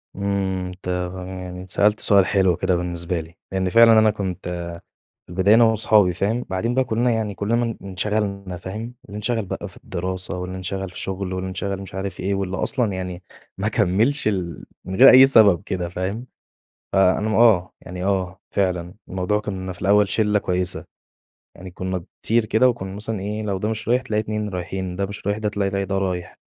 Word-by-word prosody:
إمم، 95 -2 -1
أنت 90 +1 -11 0.3
فاهم 90 -1 -7
يعني 90 0 -7
سألت 105 +3 +2
سؤال 100 -3 +5
حلو 95 -4 +2
كده 90 0 +1
بالنسبة 85 0 -2
لي، 80 +2 -10 0.2
لأن 95 -1 0
فعلًا 115 +2 +7
أنا 110 -1 +4
كنت، 95 -3 -5
آآ، 85 -1 -5 0.5
في - - -17
البداية 95 +4 +4
أنا 115 - +7
وأصحابي 110 -4 +4
فاهم، 110 +7 -1
بعدين 115 +6 -1
بقى 130 - +2
كُلّنا 120 +1 +1
يعني 110 -3 -1
كُلّنا 105 +4 0
م 115 -2 -1
انشغلنا 100 -1 -2
فاهم، 110 +7 -7
اللي 105 0 -9
انشغل 110 +1 -1
بقى 95 - -5
في - - -17
الدراسة 95 +1 -4
واللي 90 +1 -5
انشغل 95 +1 -4
في - - -8
شغله 95 -1 -3
واللي 95 0 -3
انشغل 95 +1 -3
مش 95 - -10
عارف 95 -1 -4
إيه 100 +2 -1
واللي 95 -1 -2
أصلًا 125 -5 0
يعني 90 -1 -5 0.4
ما - - 0
كمّلش 110 +9 +2
ال 90 -5 -3 0.2
من 95 - -5
غير 130 - +9
أي 130 +1 +9
سبب 105 -9 +6
كده 90 -3 -3
فاهم، 95 +7 -4 0.7
فأنا 95 +2 +3
م 110 - 0
آه، 110 -6 +4
يعني 90 +1 -7
آه، 95 -1 -1
فعلًا، 90 -3 -1
الموضوع 95 +3 -1
كُنّا 95 -3 -5
في - - -12
الأول 105 0 +4
شِلّة 105 +1 +2
كويسة، 90 -2 -1 0.7
يعني 90 0 -10
كُنّا 95 -1 -4 0.2
كتير 115 0 +2
كده 110 +4 +4
وكُنّا 95 -5 -4
مثلًا 105 0 -3
إيه، 105 +3 -4
لو 100 -2 -1
ده 105 +3 -2
مش 110 0 -4
رايح 125 +2 +3
تلاقي 105 -4 -1
2 105 -1 -3
رايحين، 90 0 -4
ده 100 +1 -1
مش 100 0 -8
رايح 100 +1 +1
تلاقي 100 -2 -1
ي 100 - -2
ده 95 0 -2
رايح. 90 -2 -3
95 Hz, 195 wpm, -22 LUFS, 90-105 Hz, 0.7 s, غير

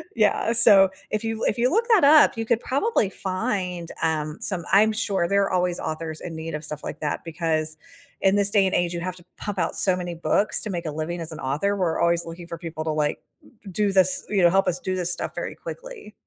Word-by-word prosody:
Yeah, 225 +1 +2
so 195 -5 +8 0.2
if 215 +1 -2
you 225 0 -2
l - - -5
if 210 - -3
you 245 +2 +2
look 450 - +1
that 425 -9 +5
up, 300 -4 +6
you 225 - -2
could 230 0 +1
probably 275 - 0
find, 185 -3 -3
um, 155 -1 -1
some 185 -4 -2
I'm 215 +3 +5
sure, 205 -5 -1
there 200 +2 +2
are 195 - -2
always 180 -1 0
authors 160 0 -5
in 165 - -7
need 160 0 -6
of 150 - -6
stuff 150 0 -7
like 150 - -6
that, 150 -2 -3
because 160 -1 -1 0.5
in 195 +1 +3
this 200 -1 +3
day 200 -2 +4
and 190 - 0
age, 175 0 0
you 170 - -4
have 180 +1 -4
to 175 - -17
pump 205 -2 -5
out 165 - -1
so 185 -2 +3
many 175 -1 -5
books 200 +5 +1
to 215 - -4
make 175 -3 -4
a 155 - -3
living 160 +3 -4
as 165 - -6
an 155 - -9
author. 150 +10 -1
We're 175 -4 -1
always 170 0 +1
looking 170 +1 -9
for 170 -1 -7
people 165 -2 -6
to, 160 - -1
like, 150 - -2 0.4
d 195 - -10
do 205 +2 0
this 185 -1 +3
you 200 -2 +1
know, 175 - +7
help 195 - +2
us 180 0 0
do 185 +1 -3
this 180 -1 0
stuff - - -3
very - - -5
quickly. - - -9
180 Hz, 250 wpm, -23 LUFS, 165-205 Hz, 0.5 s, so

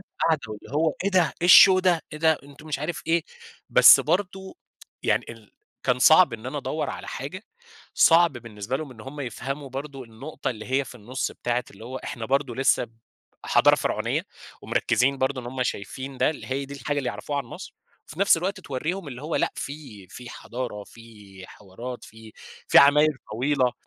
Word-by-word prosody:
عملت - - -18 0.2
قعدة 160 -3 +2
واللي 105 +4 -10
"هو 155 0 +1
إيه 200 - +1
ده 185 -3 +2
إيه 175 - +2
الshow 185 0 +9
ده 180 -3 +2
إيه! 155 - -7
ده 160 -1 +3
أنتم" 145 +2 -15
مش 150 - -2
عارف 155 +3 -4
إيه، 165 0 +1 0.5
بس - - +8
برضه 190 - -2 0.5
يعني - - +1
ال - - -18 0.3
كان - - +1
صعب - - +6
إن - - -7
أنا - - -4
ادوّر - - -3
على - - -8
حاجة - - -6 0.5
صعب 170 -1 +5
بالنسبة 115 0 -5
لهم 150 -3 -7
إن 115 - -13
هُم 140 +6 -9
يفهموا 135 +2 -5
برضه 135 0 -7
النقطة 120 +8 -6
اللي 110 -3 -8
هي 135 +1 +1
في 130 - -12
النُص 125 +4 -4
بتاعة 120 0 -2
اللي 105 +3 -13
هو 130 +2 -6
إحنا 120 -2 -6
برضه 135 -2 0
لسه 135 -1 +2
ب 115 -1 -21 0.5
حضارة - - +5
فرعونية - - -2 0.4
ومركزين 135 +2 +1
برضه 130 0 -1
إن 120 - -10
هُم 130 +1 -3
شايفين 130 +4 -5
ده، - - +3
اللي 155 - -9
هي 135 +1 -2
دي 140 +1 -9
الحاجة 145 +1 -3
اللي 135 - -2
يعرفوها 140 +8 -4
عن 140 - -3
مصر، 115 - -10 0.3
وفي 160 +6 -9
نَفْس 200 - +5
الوقت 190 +4 -3
توريهم 160 +4 -4
اللي 125 -1 -9
هو 155 +2 -2
لأ - - 0
في 135 -10 -8
في 120 +5 -10
حضارة 120 -4 -6
في 105 -5 -14
حوارات 120 +6 -9
في 110 0 -14 0.4
في - - +7
عماير 150 +1 +5 0.2
طويلة 130 +2 +1
135 Hz, 195 wpm, -25 LUFS, 120-155 Hz, 0.5 s, الshow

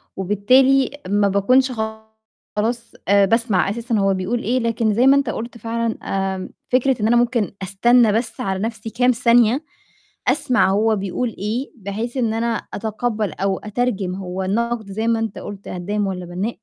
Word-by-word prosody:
وبالتالي 255 +8 +3 0.2
ما 205 0 +3
باكونش 255 +7 +3
خلاص 220 0 -5 0.2
آآ 200 +1 +5
باسمع 225 -3 +2
أساسًا 235 +2 -2
هو 195 0 +2
بيقول 190 +6 -1
إيه، 250 +4 +1
لكن 230 -2 0
زي 240 +5 +3
ما 275 - +7
أنت 275 -4 0
قُلت 235 +2 -5
فعلًا، 230 0 -2
آمم، 190 -1 -2 0.2
فكرة 255 -1 +2
إن 210 - +2
أنا 235 - +4
ممكن 240 -3 +1
أستنى 225 +4 +4
بس 225 0 -2
على 190 -1 -2
نفسي 225 +1 -4
كام 250 +3 +2
ثانية 240 +3 +3 0.6
أسمع 250 -9 +2
هو 215 +2 +2
بيقول 200 +5 -2
إيه، 220 +7 -3
بحيث 220 +5 -5
إن 230 -3 +1
أنا 230 0 -2
أتقبَّل 220 0 -2
أو 195 -1 -1
أترجم 210 -4 -2
هو 190 0 -4
النقد 220 +1 -1
زي 220 +3 -2
ما 230 -1 +2
أنت 225 -3 -3
قُلت 200 -1 -9
هدّام 200 +3 -2
ولا 180 -2 -4
بنّاء. 180 +5 -3
220 Hz, 165 wpm, -20 LUFS, 200-240 Hz, 0.6 s, ما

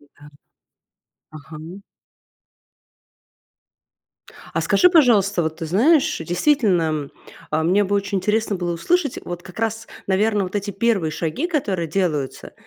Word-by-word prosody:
Да. 145 0 -18 1.0
Ага. 155 +5 -10 2.7
А - - 0
скажи, 360 - +4
пожалуйста, 210 - +4
вот 160 0 -3
ты 165 - -5
знаешь, 260 - +3
действительно, 180 - +2
м, 150 -3 -3 0.4
а 155 +1 0
мне 190 +5 +3
бы 200 - -1
очень 200 0 -1
интересно 210 0 0
было 175 -1 -2
услышать, 290 - 0
вот 175 0 -6
как 180 +2 -12
раз, 225 0 -2 0.2
наверно, 205 +1 +1
вот 185 +3 -4
эти 205 0 -3
1 195 -5 0
шаги, 165 - -2
которые 200 - -2
делаются. 155 -6 -2
190 Hz, 130 wpm, -21 LUFS, 165-220 Hz, 2.7 s, скажи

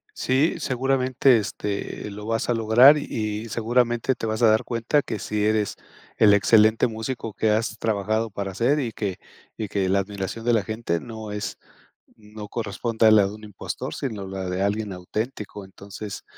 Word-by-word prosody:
Sí, 135 +5 +1
seguramente, 130 0 +2
este, 105 0 -4
lo 105 +1 -8
vas 115 +1 -1
a 120 - +2
lograr, 120 +6 +6
y 110 -4 -4
seguramente 120 +3 +1
te 115 - -4
vas 110 +1 -2
a 115 - +7
dar 110 0 +2
cuenta 120 +5 0
que 110 - -4
si 105 +1 -1
eres 110 -1 +1 0.4
el 105 -2 +6
excelente 110 +3 +4
músico 110 0 -5
que 110 +2 0
has 110 +1 0
trabajado 110 +1 -1
para 100 -1 -5
ser 130 +9 +2
y 120 -5 -3
que 100 -4 -3 0.4
y 110 - -4
que 95 -1 -1
la 100 +1 +3
admiración 100 +2 -5
de 120 - +3
la 110 -3 +3
gente 110 -6 -2
no 110 -2 -8
es 105 0 -5 0.6
no 105 -1 -10
corresponde 110 +1 -1
a 110 - +8
la 105 -2 +6
de 100 - -6
un 110 - -12
impostor, 105 -2 -6
sino 110 -7 -4
la 95 -1 -4
de 90 +1 -1
alguien 105 0 -1
auténtico, 105 +3 -5
entonces 100 +1 -9
110 Hz, 180 wpm, -24 LUFS, 100-115 Hz, 0.6 s, a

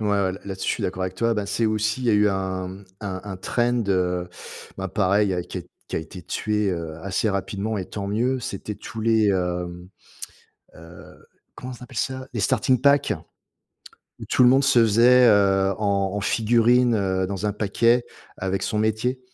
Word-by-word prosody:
ouais, 105 - -1
ouais, 100 -2 +1
là-dessus, 95 -1 -4
je - - +3
suis - - -6
d'accord 95 - -3
avec 95 0 -4
toi. 115 +1 +1
Ben, 105 -2 -2
c'est 110 +3 0
aussi, 110 +2 0
il - - -2
y 115 - +4
a - - +3
eu 105 0 +4
un, 95 -1 -2
mmh, 95 +2 -10 0.2
un 95 -3 -4
un 95 -2 -6
trend, 120 +5 0
heu, 90 -2 0 0.5
bah, 95 - -2
pareil, 100 +1 +2
il - - 0
a 90 - -2 0.5
qui - - -6
a - - +1
été 80 +3 -10
tué, 105 +4 -1
heu, 80 -3 -4
assez 100 +3 -1
rapidement, 100 +2 -3
et 95 - -3
tant 100 -1 -5
mieux. 125 +5 0
C'était 105 -1 -5
tous 110 - -8
les, 110 -2 +3
mmh, 90 -1 -3 0.9
heu, 80 +1 -14 0.3
comment 130 +1 -7
on - - -15
appelle 125 - -13
ça? 130 +2 -3
Les 110 - -1
starting 125 +5 +2
pack? 140 +1 +3 1.1
Où - - -6
tout 125 - +2
le 125 - +7
monde 135 +2 +4
se 125 -3 +5
faisait, 120 +3 +6
heu, 100 -2 +4
en 100 -2 0
en 105 - -2
figurine, 120 +3 +3
heu, 95 -3 0
dans 100 +1 -3
un 105 - 0
paquet 115 +4 +2 0.3
avec 95 +1 -2
son 110 - -1
métier, 110 +4 0
105 Hz, 200 wpm, -23 LUFS, 95-115 Hz, 1.1 s, le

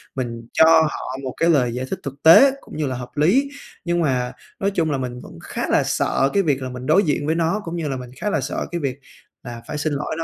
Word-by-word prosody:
mình 115 -3 -5
cho 160 - +6 0.2
họ 150 -4 -3
một 130 -1 -4
cái 165 - +2
lời 125 -7 +2
giải 125 +2 -3
thích - - -4
thực 140 +1 -8
tế, 220 +13 +8
cũng - - -11
như 155 -2 -1
là 130 - -3
hợp 125 0 -7
lý. 220 - +3 0.4
Nhưng 175 0 0
mà 125 -5 0 0.3
nói 200 +1 0
chung 165 -5 0
là 140 - 0
mình 125 -1 -5
vẫn - - -12
khá - - -4
là - - +3
sợ 135 - +1
cái 200 - +3
việc 140 -5 0
là 130 - -4
mình 125 0 -7
đối 195 +9 +4
diện 145 -2 -1
với 160 +2 0
nó, 170 +5 0
cũng 165 0 -5
như 165 -3 -3
là 135 -2 -2
mình 125 -1 -9
khá 210 - -2
là 160 - 0
sợ 130 - -3
cái 175 - -2
việc 135 -2 -3 0.4
là 120 -2 -8
phải 150 - -4
xin 150 0 -1
lỗi 145 +2 -3
nó, 165 - -2
145 Hz, 275 wpm, -21 LUFS, 130-165 Hz, 0.4 s, tế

